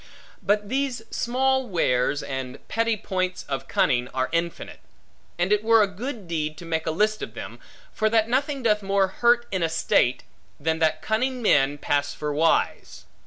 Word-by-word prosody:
But 205 +1 +1
these 260 -1 -1
small 265 +1 +1
wares, 145 - +1
and 130 -2 -6
petty 230 -1 0
points, 185 -1 -2
of 135 -1 -4
cunning, 125 -1 +1
are 130 0 0
infinite; 170 0 -3 0.6
and 180 +4 +2
it 210 0 +1
were 225 -1 +5
a - - +1
good 215 +1 -6
deed 155 -2 -2
to 175 - -10
make 160 -1 -2
a - - +2
list 210 +6 +1
of - - -6
them; - - -8 0.3
for 215 0 +1
that 220 0 +3
nothing 275 +2 -1
doth 210 -2 +2
more 195 0 +2
hurt 240 +4 +3
in 190 -2 -1
a 165 - +1
state, 130 -5 +1 0.4
than 160 +2 -1
that 155 -1 +1
cunning 250 +3 -1
men 145 -7 +3
pass 145 0 -1
for 150 -1 -3
wise. 160 +3 0
190 Hz, 175 wpm, -24 LUFS, 155-230 Hz, 0.6 s, were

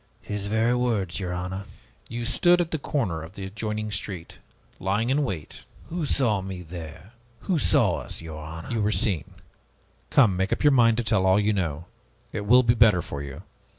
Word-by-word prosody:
His 105 -1 -4
very 110 +3 +2
words, 110 -8 0
your 90 -2 -3
honor." 90 +2 -4 0.4
"You 120 0 -4
stood 175 +8 +4
at 170 -2 -1
the 160 - -1
corner 105 - -1
of 80 +3 -10
the 95 - -6
adjoining 105 +2 -4
street, 95 -4 -6 0.4
lying 105 +6 0
in 145 +2 +2
wait." 90 - -5 0.3
"Who 165 -2 -2
saw 115 -9 +2
me 95 -1 -6
there? 85 +3 -9 0.3
Who 180 -5 0
saw 85 - +3
us, - - -6
your 80 -2 -8
honor?" 80 +2 -8
"You 115 -2 0
were 105 +1 +2
seen. 95 - 0 0.7
Come, 110 -9 +5
make 95 +2 -1
up - - -1
your 145 - +6
mind 115 -4 +5
to 120 - 0
tell 105 -4 +2
all 95 +2 +5
you 105 +1 +2
know. 85 -5 -2 0.5
It 105 -2 -4
will 125 +3 +7
be 115 -1 +4
better 110 -7 +5
for 70 - -6
you. 70 +4 -8
100 Hz, 195 wpm, -25 LUFS, 90-115 Hz, 0.7 s, will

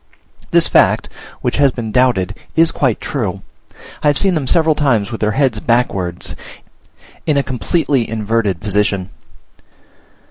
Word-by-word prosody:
This - - +4
fact, - - +3 0.3
which - - -1
has 140 -1 +5
been 115 -3 -5
doubted, 110 -6 +2 0.2
is 165 0 +4
quite 130 -6 0
true; - - -3 0.6
I - - +1
have 145 -1 +3
seen 195 -2 +2
them 150 -5 -2
several 160 0 +3
times 120 -8 0
with 115 - -6
their 105 0 +1
heads 130 -4 +1
backwards 100 -8 -1 0.9
in 150 -2 +2
a 140 - +2
completely 135 0 -1
inverted 110 -4 -1
position. 100 -2 -1
120 Hz, 140 wpm, -16 LUFS, 105-145 Hz, 0.9 s, has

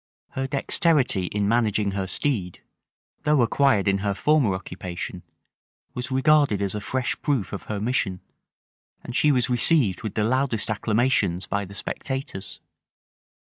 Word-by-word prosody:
Her 135 0 -3
dexterity 135 - +2
in 100 +1 -1
managing 105 -3 +1
her 95 -1 -3
steed, 95 -4 -2 0.6
though 150 -4 +3
acquired 115 -4 +2
in 100 0 +2
her 100 0 -1
former 135 -5 +2
occupation, 90 -1 -6 0.7
was 125 +1 -5
regarded 135 -4 +3
as 100 -1 -2
a 105 - -4
fresh 125 +4 -2
proof 135 - -1
of 100 - -6
her 105 -2 -2
mission; 105 -5 -1 0.8
and 120 - -7
she 150 - +4
was 125 -3 +2
received 125 - +3
with 110 -3 -5
the 105 - +1
loudest 120 -2 0
acclamations 110 -4 +1
by 100 +2 -2
the 100 +2 -12
spectators. 135 -4 -5
110 Hz, 140 wpm, -24 LUFS, 100-135 Hz, 0.8 s, she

